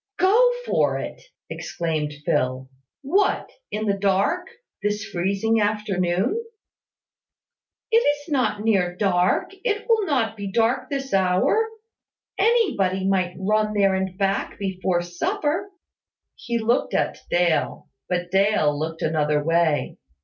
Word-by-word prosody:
"Go 445 +7 +5
for - - +1
it!" - - -6 0.3
exclaimed 155 -3 -3
Phil. 130 +1 0 0.4
"What, 380 +9 +1 0.2
in 215 +1 -3
the 200 - +2
dark, 200 - +1 0.3
this 210 +1 -1
freezing 200 +5 0
afternoon?" 205 - 0 1.5
"It 455 - +6
is 290 -9 +1
not 255 -7 0
near 185 -5 +1
dark; 180 - +1
it 425 -3 -1
will 450 -2 +3
not 230 -7 0
be 200 -2 -5
dark 235 +4 +1
this 270 -3 -4
hour. 190 - +2 0.7
Anybody 345 - +2
might 185 -2 +1
run 215 +2 0
there 195 -1 +3
and 190 -1 -2
back 195 0 -1
before 185 -3 -1
supper." 330 - -2 0.6
He 235 0 -3
looked 230 +2 0
at - - 0
Dale; 170 -4 +1 0.2
but 175 -1 -2
Dale 195 -6 +3
looked 160 +1 -4
another 150 -2 +1
way. 165 -1 +1
200 Hz, 120 wpm, -23 LUFS, 180-255 Hz, 1.5 s, It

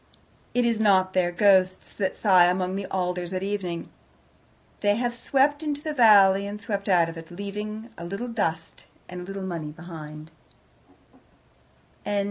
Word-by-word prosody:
It 245 -1 +3
is 230 -2 +1
not 190 -3 +3
their 180 -2 +1
ghosts 185 0 +2
that 190 -2 -2
sigh 185 -4 +5
among 185 +1 0
the 195 -1 -4
alders 180 -1 -2
at 185 0 -2
evening. 195 -4 -3 0.9
They 205 0 +2
have 240 +1 -1
swept 275 +5 +1
into 295 -1 -3
the 310 - -3
valley 200 -6 +6
and 205 +1 -6
swept 205 -1 -4
out 175 -3 +4
of 165 0 -7
it, 165 - -12
leaving 210 +4 -6
a - - -7
little 195 +8 -5
dust 165 -8 -3 0.2
and 180 0 -7
a - - -6
little 195 +1 -6
money 170 -5 -4
behind. 155 -2 -10
195 Hz, 155 wpm, -25 LUFS, 175-210 Hz, 0.9 s, valley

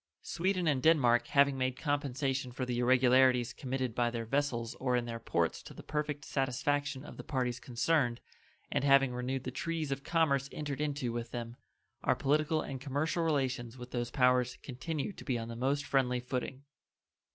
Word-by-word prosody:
Sweden 185 +1 0
and 140 -4 +2
Denmark 125 -6 +4
having 140 -1 +3
made 130 0 0
compensation 140 -3 -1
for 130 +1 -3
the 120 -1 -2
irregularities 125 -1 +4
committed 130 -3 -3
by 120 +1 +1
their 115 -1 -4
vessels 120 -2 -1
or 125 -1 +1
in 120 -1 0
their 115 -1 -5
ports 85 -7 0
to - - -12
the - - -10
perfect 150 -2 -3
satisfaction 135 +1 -1
of - - -10
the - - -7
parties 125 -3 -1
concerned, 125 0 +1 0.5
and - - 0
having 135 -2 +5
renewed 125 +1 -2
the 130 - -4
treaties 160 +1 -3
of 135 0 -3
commerce 140 -5 +1
entered 145 -1 -4
into 140 -5 -1
with 120 0 -4
them, 120 -1 -5 0.5
our - - +3
political 155 +2 +1
and 135 -2 -6
commercial 145 +5 -1
relations 130 -6 -1
with 125 0 -9
those 120 -1 -2
powers 125 0 +2
continue 150 +7 -4
to - - -11
be 130 -4 -1
on 115 0 -5
the 115 - -6
most 135 +4 0
friendly 125 -2 +1
footing. 130 +2 -4
130 Hz, 180 wpm, -32 LUFS, 125-145 Hz, 0.5 s, having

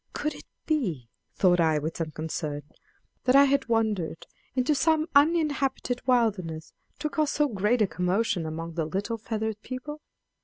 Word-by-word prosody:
Could 300 +1 -2
it - - -12 0.2
be, 180 - -1 0.3
thought 180 -2 +4
I 160 -2 +3
with 155 +2 -3
some 165 -2 -2
concern, 155 -1 -4 0.6
that 255 0 +4
I 280 - +9
had 275 -2 +2
wandered 215 -8 0 0.3
into 255 +3 +2
some 315 +2 +2
uninhabited 285 -5 +2
wilderness, 195 -11 +1 0.2
to - - -2
cause 305 -1 0
so 295 -1 +2
great 215 0 +2
a - - +2
commotion 180 -1 0
among 165 +1 -5
the 160 -1 -1
little 200 +8 -3
feathered 220 -1 -3
people? 295 +5 -7
220 Hz, 155 wpm, -27 LUFS, 165-275 Hz, 0.6 s, I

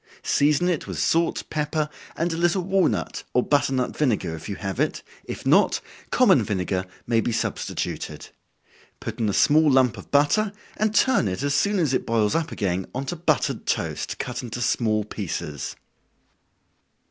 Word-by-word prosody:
Season 150 +4 +3
it 175 -4 -1
with - - -5
salt, 165 +1 +1
pepper, 150 0 -1 0.3
and 165 +1 -1
a - - -2
little 175 +2 +1
walnut, 190 0 0
or 125 - +4
butternut 135 -3 +1
vinegar, 105 - 0
if 80 - -9
you 100 - -3
have 95 -1 -5
it, - - 0 0.2
if - - -7
not, - - +4 0.3
common - - +5
vinegar 95 -1 -2 0.2
may 115 -1 +2
be 120 - -1
substituted. 115 - -3 0.7
Put - - -6
in 110 -2 +1
a - - -1
small 155 +6 +5
lump 130 -3 +3
of - - -12
butter, 195 +9 +3 0.2
and 215 0 0
turn 255 - +4
it 95 +7 -3
as 145 0 +1
soon 200 +8 +2
as 155 -7 +1
it - - 0
boils 110 -2 +2
up 165 -1 -1
again 95 -3 -1
on 135 +2 -2
to 175 - -3
buttered 170 +1 0
toast, - - -2
cut 125 0 -4
into 120 -1 -6
small 110 -3 +1
pieces. 85 - -5
135 Hz, 170 wpm, -24 LUFS, 110-165 Hz, 0.7 s, common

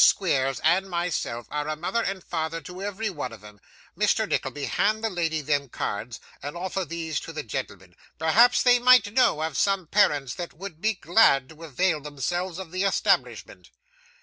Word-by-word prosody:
Squeers 135 -8 +2
and 185 +4 +2
myself 170 -9 -2
are 150 0 -2
a 155 - -2
mother 175 +9 -1
and 195 -4 -3
father 160 0 -3
to 180 +2 -9
every 205 +1 -3
one 145 -8 -5
of 110 -3 -12
'em. 105 -1 -14 0.4
Mr. - - +1
Nickleby, 145 -1 -2
hand 215 +7 0
the 225 - 0
lady 165 -3 -1
them 145 -1 -1
cards, 110 +1 -4 0.2
and 145 +4 -6
offer 185 +2 -3
these 165 -3 -4
to - - -8
the 155 - -5
gentleman. 95 -4 -6 0.2
Perhaps 205 +11 +4
they 245 -1 +5
might 245 -4 +5
know 235 -11 +3
of 160 -3 -3
some 195 +1 +1
parents 145 - +2
that 175 +3 -6
would 170 -2 -9
be 220 0 +1
glad 160 - +3
to 160 +1 -13
avail 160 +2 0
themselves 165 +5 -3
of 190 -4 -8
the 185 +1 -2
establishment. 195 - 0
165 Hz, 180 wpm, -25 LUFS, 145-195 Hz, 0.4 s, they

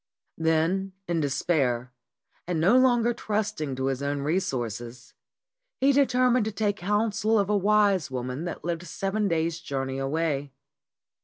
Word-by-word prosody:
Then 165 +4 +1
in 170 -1 0
despair, 135 -4 0 0.5
and 175 -3 -1
no 185 +9 +4
longer 240 -2 +4
trusting 210 - -2
to 130 0 -2
his 135 0 -1
own 140 0 -2
resources, 120 - -3 0.7
he 275 +1 +4
determined 255 -4 +3
to 220 - -2
take 205 -1 -1
counsel 210 +3 +1
of 200 0 +1
a - - +3
wise 200 -4 +3
woman 130 +4 -4
that 175 - -6
lived 170 0 -3
seven 195 +5 -1
days' 165 -1 0
journey 135 -4 -3
away. 145 -1 -1
170 Hz, 140 wpm, -26 LUFS, 140-210 Hz, 0.7 s, no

